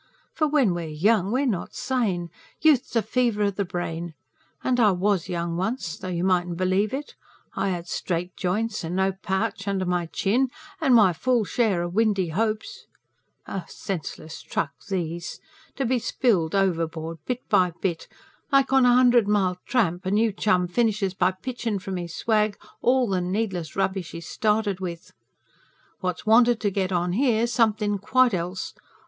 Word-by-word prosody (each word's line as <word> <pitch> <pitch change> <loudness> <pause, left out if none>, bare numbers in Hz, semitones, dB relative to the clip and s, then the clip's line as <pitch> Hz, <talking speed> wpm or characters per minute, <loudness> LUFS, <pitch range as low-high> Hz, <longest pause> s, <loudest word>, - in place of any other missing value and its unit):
For 310 - +1
when 280 -10 +3
we're 170 -2 -4
young, 190 +6 +2
we're 260 +4 +1
not 210 -9 -2
sane. 195 -10 -1 0.3
Youth's 290 -6 +3
a 230 - +3
fever 230 -1 +1
o' 200 - +2
the 200 +1 -2
brain. 175 -2 -4 0.5
And 250 -1 +1
I 220 -3 +6
WAS 185 -1 0
young 170 -1 -2
once, 190 -3 -2
though - - -8
you 175 -1 -2
mightn't 175 -2 +1
believe 185 +3 +1
it; 285 +2 -5 0.4
I 195 - 0
had 175 -2 -3
straight 180 0 -3
joints, 210 +4 -1
and 165 +2 -3
no 190 +1 +2
pouch 190 +2 -3
under 195 -2 0
my 175 -1 0
chin, 235 +10 +1 0.3
and 270 -6 +5
my 200 -6 +6
full 245 +6 +1
share 195 -1 +1
o' - - -2
windy 195 -1 +1
hopes. 215 +5 -2 0.8
Senseless 160 -3 -6
truck - - -2 0.2
these! 170 -3 -3 0.4
To 270 - -1
be 250 +1 +1
spilled 210 -8 +1
overboard 165 -4 -1
bit 250 0 -3
by 180 -1 +3
bit 170 -4 -2 0.4
like 275 -1 +3
on 265 -2 +6
a 245 - +5
hundred 245 -3 +5
mile 190 -3 +1
tramp 190 -8 +1
a - - +1
new 215 +3 +2
chum 185 -3 +2
finishes 210 -1 0
by 185 -1 +2
pitchin' 230 +2 -4
from 190 0 -5
his 170 -2 -6
swag 215 -2 +1 0.2
all 255 0 +3
the 190 -3 0
needless 180 -4 -2
rubbish 190 -3 -1
he's 165 0 -7
started 210 -3 0
with. 170 -3 -6 0.9
What's 180 0 -3
wanted 235 +1 +5
to 205 - +1
get 190 -1 -1
on 175 0 0
here's 235 0 +2
somethin' 210 -3 +2
quite 250 +4 +3
else. 180 +1 -3
195 Hz, 165 wpm, -25 LUFS, 180-230 Hz, 0.9 s, I